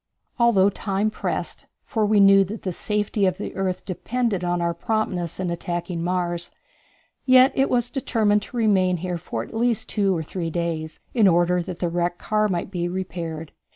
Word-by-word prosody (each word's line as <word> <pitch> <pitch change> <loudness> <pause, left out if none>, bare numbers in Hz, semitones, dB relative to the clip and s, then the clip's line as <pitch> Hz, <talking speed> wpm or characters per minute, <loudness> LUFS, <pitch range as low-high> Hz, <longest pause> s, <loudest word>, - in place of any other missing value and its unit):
Although 205 -5 +4
time 200 +2 -1
pressed, - - -4 0.2
for 220 -2 0
we 210 0 +4
knew 195 0 +7
that 210 +4 -7
the 185 - -2
safety 210 +1 0
of 185 -1 -1
the - - -6
earth 185 -1 -2
depended 220 +1 -2
upon 175 0 0
our 170 0 0
promptness 180 -2 -2
in 180 -2 -1
attacking 175 0 -3
Mars, 175 -1 -1 0.8
yet 255 +1 +7
it 270 +1 +2
was 245 -1 +1
determined 215 -6 +1
to 245 - -8
remain 190 -5 +3
here 175 0 -4
at 115 0 -3
least 235 -1 0
two 195 -4 +1
or 160 - -3
three 165 +1 -4
days 160 -2 -3
in 225 -5 +5
order 175 0 +3
that 170 0 -6
the 175 - -1
wrecked 175 +1 -1
car 215 -1 +1
might 180 -1 -2
be 175 -2 -2
repaired. 170 -3 -5
185 Hz, 180 wpm, -23 LUFS, 175-215 Hz, 0.8 s, knew